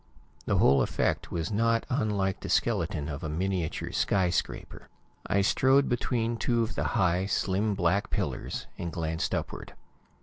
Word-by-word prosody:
The - - +2
whole 70 +1 +5
effect - - -1
was 85 +2 -2
not 115 +2 +2
unlike 105 -7 0
the - - -7
skeleton 85 -9 0
of 70 -2 -5
a 80 - -3
miniature 90 +1 -2
skyscraper. 90 -3 -1 0.4
I 100 - +2
strode 130 +7 +4
between 120 -1 0
two 115 +1 +1
of 115 - -3
the - - -2
high, 90 -1 +2
slim 100 +1 0
black 95 +2 +1
pillars - - -3
and 85 - -3
glanced 80 -1 -2
upward. - - -5
95 Hz, 145 wpm, -28 LUFS, 85-115 Hz, 0.4 s, whole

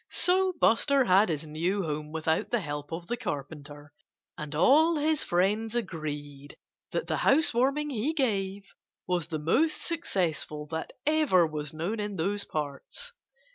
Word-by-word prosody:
So 370 +1 +2
Buster 270 +4 +4
had 195 +2 +5
his 155 -1 -2
new 170 +6 -1
home 150 -1 -4
without 160 0 0
the 240 - +1
help 145 -5 -5
of 165 +1 -5
the 240 - -2
Carpenter. 145 - -6 0.4
And 150 -1 -6
all 305 - +5
his 305 0 +1
friends 210 +6 +1
agreed 145 -8 -5 0.3
that - - -1
the - - -1
house 290 0 +3
warming 275 +5 +1
he 255 +4 0
gave 200 -9 -1 0.4
was 175 -3 -1
the 165 -2 -3
most 295 - +2
successful 175 - -2
that 160 0 -4
ever 295 - +4
was 150 -2 -4
known 175 +8 -3
in 205 -1 -3
those 200 +4 -1
parts. 155 - -5
185 Hz, 150 wpm, -28 LUFS, -, 0.4 s, had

